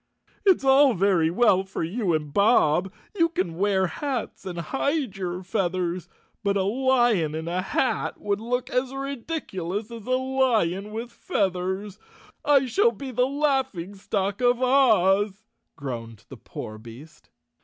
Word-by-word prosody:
"It's 375 -7 +5
all 270 -1 +5
very 180 -4 +3
well 190 0 +3
for 190 -2 -5
you 180 0 0
and 150 -2 -4
Bob. 190 -3 +3 0.2
You 335 -4 +3
can 185 - -2
wear 195 -1 +2
hats 250 - -4
and 175 -2 -5
hide 270 - -1
your 180 -1 -4
feathers, 180 -2 -2 0.3
but 200 -1 +1
a 190 - +1
lion 240 - +2
in 160 +1 -4
a 180 +2 -1
hat 250 +7 -1
would 205 0 -2
look 245 +2 -2
as 250 +1 0
ridiculous 235 - -4
as 230 -2 -9
a 255 0 +2
lion 230 -8 0
with 230 +2 -5
feathers. 190 0 -2 0.4
I 280 -2 +4
shall 410 - +3
be 275 - -7
the 250 +1 +2
laughing 265 - -1
stock 200 +1 -2
of 245 -1 +3
Oz," 215 -6 +3 0.3
groaned 115 -5 -7
the - - -10
poor 110 0 -8
beast. 120 +8 -13
205 Hz, 145 wpm, -25 LUFS, 180-255 Hz, 0.4 s, It's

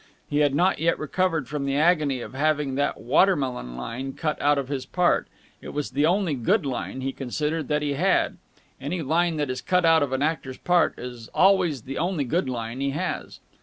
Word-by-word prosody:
He 145 - 0
had 145 -2 +3
not 180 +2 +2
yet 165 +2 +2
recovered 165 -3 -1
from 145 +1 -3
the 135 - 0
agony 150 -4 +2
of - - -8
having 150 0 0
that 145 +2 -1
water 185 +9 +4
melon 125 - -4
line 130 - -5
cut 155 -1 -3
out 145 0 +3
of 140 -2 -2
his 135 -2 -3
part. 180 -1 +1 0.3
It - - -9
was 150 -2 -2
the 145 +4 +2
only 180 -2 +1
good 145 - +1
line, 130 0 -4
he 135 +1 -2
considered, 150 +3 -2
that 150 0 0
he 145 -1 0
had. 185 +7 +1 0.4
Any 160 +5 -3
line 165 +3 +1
that 145 -3 -1
is 130 - -4
cut 180 -1 +2
out 165 -1 +5
of 145 -2 0
an 135 +1 0
actor's 150 -4 -2
part 175 -1 +2
is 120 -2 -8
always 180 - +3
the 135 +1 -5
only 175 -3 0
good 140 +2 -1
line 120 +1 -4
he 140 - +1
has. 140 +2 -4
145 Hz, 210 wpm, -25 LUFS, 130-165 Hz, 0.4 s, out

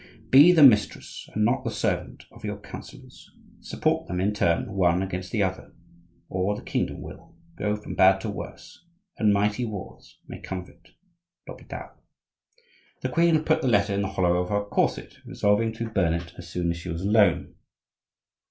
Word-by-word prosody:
Be 145 +7 +9
the 165 -4 +6
mistress 105 -7 +3
and 105 0 +2
not 120 +4 +1
the - - -2
servant - - -3
of - - -16
your - - -4
counsellors; - - -12 0.3
support - - -1
them, 90 +1 -3
in 100 +3 +1
turn, 85 -4 0
one 90 -1 +2
against 95 -1 -5
the 105 -3 +1
other, 95 -1 -4 0.5
or 95 +3 -1
the - - -9
kingdom - - -2
will - - -12 0.2
go 105 +4 -1
from 105 - -8
bad 95 +1 +5
to 110 - -4
worse, 100 - -10 0.4
and 110 -2 +4
mighty 105 +4 +1
wars 105 -5 -8
may - - -8
come 95 - -5
of 90 -1 -8
it. 85 +2 -23 0.6
L'Hopital. - - -9 1.1
The - - -2
queen 165 -2 +3
put 160 0 +2
the - - -1
letter 100 -4 +2
in 100 - 0
the 100 - -1
hollow 90 -2 +1
of 90 0 -2
her 100 0 0
corset, 100 - -1
resolving 105 +2 +1
to 115 0 -5
burn 90 -6 +1
it 85 0 -6
as 85 -1 -11
soon 85 -1 -1
as 85 - -4
she 85 +2 -8
was 85 +1 -4
alone. 100 -3 +3
100 Hz, 180 wpm, -25 LUFS, 90-110 Hz, 1.1 s, Be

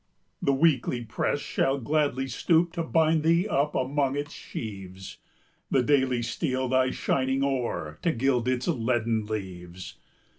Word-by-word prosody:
The 140 - +2
Weekly 135 -4 +2
press - - -1
shall 135 +1 0
gladly 140 0 0
stoop 165 +6 +2
To 170 - -2
bind 160 -1 +2
thee 170 +5 +3
up 145 -4 0
among 135 +1 0
its 145 +1 -4
sheaves; 95 -3 -8 0.5
The 130 - +3
Daily 130 -3 +2
steal 130 +2 -1
thy 130 0 +2
shining 135 +1 0
ore, 120 - -2
To 170 - +2
gild 125 -2 +1
its 125 -1 0
leaden 115 -6 0
leaves. 95 -4 -6
130 Hz, 140 wpm, -27 LUFS, 115-145 Hz, 0.5 s, thee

